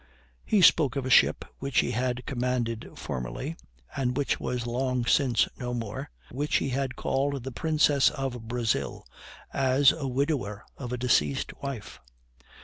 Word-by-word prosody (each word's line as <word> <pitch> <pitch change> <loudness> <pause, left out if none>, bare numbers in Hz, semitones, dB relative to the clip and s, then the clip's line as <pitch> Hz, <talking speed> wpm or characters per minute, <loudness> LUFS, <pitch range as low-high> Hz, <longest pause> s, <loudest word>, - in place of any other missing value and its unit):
He 205 -3 +3
spoke 145 -7 +5
of 135 -2 -2
a 130 - -2
ship - - +5
which 135 -2 +2
he - - -2
had 125 +1 -1
commanded 125 -4 -2
formerly, 65 - -5 0.4
and 125 -2 -1
which 145 - 0
was 125 -2 -3
long 125 0 -1
since 130 -3 +3
no 125 -1 -3
more, 115 -4 -5 0.2
which 145 +4 -1
he - - +1
had 135 0 -2
called 140 -1 -1
the 135 - -5
Princess 150 0 +3
of 125 -4 -5
Brazil, 115 - -1 0.5
as 135 +1 +4
a 145 -4 -4
widower 130 -6 -1
of 125 -3 -6
a 125 - -2
deceased 75 - +1
wife. 135 -7 -6
125 Hz, 150 wpm, -27 LUFS, 120-140 Hz, 0.5 s, spoke